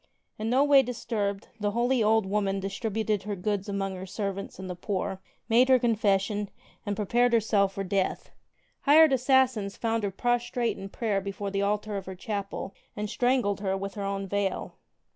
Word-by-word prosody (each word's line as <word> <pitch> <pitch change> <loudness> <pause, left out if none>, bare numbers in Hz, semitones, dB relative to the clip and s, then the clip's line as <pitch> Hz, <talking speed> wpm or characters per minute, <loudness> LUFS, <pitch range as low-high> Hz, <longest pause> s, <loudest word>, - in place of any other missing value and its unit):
In 220 +1 -2
no 260 +4 +4
way 285 -2 +7
disturbed, 220 -4 -3
the 205 0 0
holy 245 +1 +2
old 220 -1 +3
woman 195 0 0
distributed 210 +1 -2
her 205 0 -4
goods 200 +1 -2
among 195 -1 -2
her 185 +1 -7
servants 195 0 -4
and 190 - -7
the 180 - -4
poor, 190 +1 -3 0.3
made 245 +3 +4
her 260 - +7
confession 210 -3 +1 0.4
and 205 - 0
prepared 240 +4 +2
herself 205 -3 +3
for 195 - -3
death. 190 0 -1 0.5
Flired 305 0 +7
assassins 255 -6 +2
found 225 -1 0
her 200 - -1
prostrate 240 +3 0
in 195 - -8
prayer 205 -3 -1
before 200 +1 -4
the 195 0 0
altar 205 +1 -1
of 195 - -7
her 190 - -6
chapel 200 0 -4 0.2
and 210 0 -4
strangled 245 -6 +1
her 195 -1 -1
with 195 0 -5
her 205 - -5
own 195 0 -2
veil. 200 -1 -2
205 Hz, 180 wpm, -28 LUFS, 195-230 Hz, 0.5 s, way